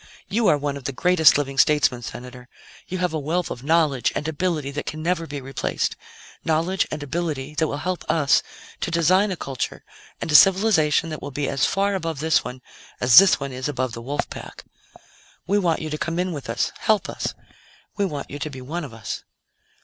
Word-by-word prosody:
"You 220 +1 +1
are 150 - +5
one 140 0 -3
of 135 - -12
the - - -1
greatest 170 0 +5
living 135 -2 -2
statesmen, 145 -5 +3
Senator; 125 +1 -9 0.4
you 185 - -4
have 180 -2 -1
a 155 - -1
wealth 165 +5 -1
of 120 - -6
knowledge 155 -4 +2
and 150 - -2
ability 160 -3 -1
that 145 +1 -5
can 155 0 -5
never 170 -1 0
be 145 -2 -5
replaced; 135 0 -2 0.5
knowledge 165 +4 +1
and 150 -1 -5
ability 150 -2 -3
that 160 - +2
will 145 - -3
help 180 +4 -3
us 145 -4 +3 0.4
to - - -2
design 180 +5 +3
a 190 - -2
culture 135 -6 -4 0.4
and - - -3
a - - -1
civilization 180 -3 +5
that 155 - -6
will - - -5
be 145 0 -2
as 140 0 +1
far 200 +1 +1
above 165 -6 -3
this 160 +1 +2
one 125 0 -8 0.4
as 120 -1 +9
this 195 -3 +5
one 140 -1 -4
is 130 +2 -3
above 130 -3 -2
the 115 - -6
wolf 140 +5 -3
pack. - - -9 0.8
We 200 +2 +2
want 170 -5 0
you 155 - -4
to 150 - -3
come 165 0 -2
in 180 +1 0
with 145 -7 -6
us, 115 - 0
help 215 -2 +2
us; - - -4 0.6
we 205 - 0
want 150 -8 -4
you 145 - -6
to 155 - -3
be 130 -3 -9
one 160 +7 -5
of 130 -6 -8
us." 110 -1 -6
150 Hz, 210 wpm, -23 LUFS, 140-175 Hz, 0.8 s, as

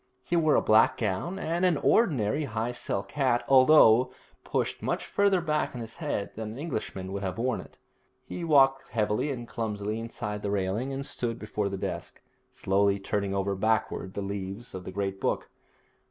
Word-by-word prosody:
He 175 - -1
wore 155 -3 +4
a - - +3
black 130 +5 +5
gown 110 - -2
and 170 -1 -2
an 180 -4 +3
ordinary 145 - +2
high 115 -1 -2
silk 100 -4 -4
hat, 130 -4 +1
although 130 -3 +6 0.3
pushed - - -2
much - - -2
farther 200 -3 +2
back 150 -4 -1
on 120 - -5
his 115 0 -8
head 145 -11 -3
than 110 -1 -5
an - - -9
Englishman 110 - -4
would 100 - -3
have 95 0 -3
worn 125 +1 0
it. - - -16 0.5
He 175 - -6
walked 135 -4 +4
heavily 105 +4 0
and 120 -4 -5
clumsily 105 -1 -3
inside 105 -2 -5
the 100 - -2
railing, 100 +6 -1
and 135 0 -4
stood 120 -4 -3
before 105 -2 -2
the 95 - -4
desk, 90 -3 -5 0.3
slowly 100 +1 +1
turning 100 0 -2
over 100 0 0
backward 110 -1 -1
the 100 - -2
leaves 100 +3 -5
of 95 0 -7
the - - -6
great 95 0 -3
book. - - -1
110 Hz, 185 wpm, -28 LUFS, 100-135 Hz, 0.5 s, although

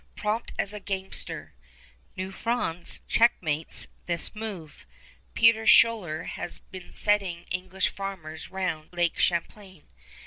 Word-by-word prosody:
Prompt 215 +2 -1
as 200 - 0
a 210 - -5
gamester, 190 - -3 0.6
New 190 +1 -4
France 195 -6 -2
checkmates 165 -9 +2 0.2
this 170 -1 -1
move. 205 -8 -7 0.5
Peter 225 -1 +5
Schuyler 185 -12 +5
has 175 - -5
been 185 -2 -11
settling 195 -5 +1
English 185 +1 0
farmers 185 -6 -6
round 185 -5 -3
Lake 175 -1 +1
Champlain. 185 0 -1
190 Hz, 110 wpm, -27 LUFS, 170-210 Hz, 0.6 s, Peter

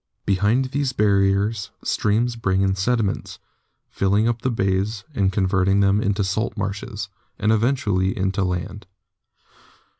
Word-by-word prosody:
Behind 105 +7 +2
these 140 -2 -1
barriers 100 0 +1
streams 115 +3 0
bring 95 -4 0
in 95 0 +2
sediments, 105 +1 -1 0.5
filling 100 +3 +2
up 120 -1 -1
the 130 - 0
bays 95 -1 -1
and 100 -6 +1
converting 95 0 +2
them 100 +1 +3
into 100 0 0
salt 105 +3 -2
marshes, 100 0 -4 0.3
and 110 - +1
eventually 110 -5 +1
into 95 +1 0
land. 90 +1 -4
100 Hz, 125 wpm, -22 LUFS, 95-110 Hz, 0.5 s, them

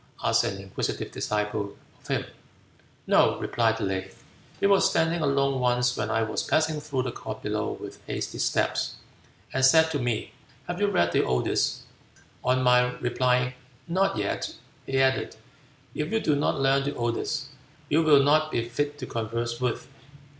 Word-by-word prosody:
asked - - +3
an 95 - -2
inquisitive 95 0 -4
disciple 105 -1 -2 0.2
of - - -18
him. - - -1 0.8
"No," - - +4
replied 115 -1 0
Le, 95 -2 -1 0.5
"he 200 - +1
was 200 -1 +5
standing 165 +1 +1
alone 140 -2 +1
once 125 0 +2
when 110 -1 -2
I 115 0 +1
was 110 - -2
passing 155 -1 +1
through 135 -4 -2
the 125 - -3
court - - -7
below - - -1
with - - -10
hasty - - -4
steps, - - 0 0.6
and 130 - 0
said 160 +4 +6
to 145 - -1
me, 120 -3 -2 0.4
'Have 175 +2 -4
you 205 - +4
read 85 - +2
the - - +3
Odes?' 65 -1 0 0.6
On 130 +1 +2
my 125 0 +4
replying, 125 +1 +1 0.3
'Not 195 +3 +1
yet,' - - -2 0.3
he 135 0 +1
added, 130 0 +1 0.6
'If 150 +1 -3
you 225 - +2
do 150 - +1
not 145 -1 0
learn 135 0 +3
the 140 +1 -3
Odes, 120 -2 -2 0.4
you 160 - +3
will 150 -3 +6
not 155 +2 +3
be 115 -5 -1
fit 145 +4 -2
to 135 - -5
converse 115 +1 -3
with.' 125 -2 -1
130 Hz, 165 wpm, -26 LUFS, 120-150 Hz, 0.8 s, said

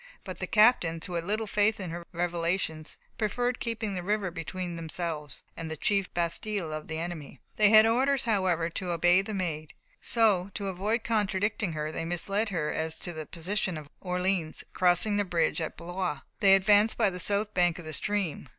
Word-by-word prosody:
But - - -7
the - - -3
captains, 195 -8 +4
who 180 - -6
had 170 -1 -2
little 215 +3 -1
faith 210 +1 +1
in 185 -4 -5
her 170 0 -7
revelations, 170 -2 -2 0.2
preferred 245 +3 0
keeping 225 -3 -3
the 180 - -3
river 200 0 -1
between 175 +1 -5
themselves 160 -4 -4
and 165 -1 -5
the 160 - -5
chief 200 +3 +1
bastiles 170 0 -2
of 155 0 -6
the 160 - -4
enemy. 160 -5 -6 0.2
They 210 -1 +6
had 215 0 +8
orders, 260 +4 +2
however, 185 -7 +1
to 180 +2 -3
obey 175 +2 +4
the 205 +1 -5
Maid, 155 -5 -3 0.3
so, 205 -5 +2
to 200 -1 -2
avoid 210 +5 -1
contradicting 205 -3 0
her, 155 0 -3
they 165 - -4
misled 195 +6 -1
her 165 -6 -1
as 160 0 -2
to 175 - -3
the 155 -1 -7
position 185 0 -2
of 150 -2 -9
Orleans; 180 -3 -1
crossing 180 +3 +3
the 205 - +2
bridge 175 -2 0
at 160 - -4
Blois, 175 -3 -3 0.2
they 195 -2 +7
advanced 205 +3 +4
by 215 -4 +3
the 180 - -6
south 205 +3 +1
bank 175 -2 +2
of 175 - -8
the 155 - -6
stream. 195 -6 -1
180 Hz, 190 wpm, -28 LUFS, 165-205 Hz, 0.3 s, had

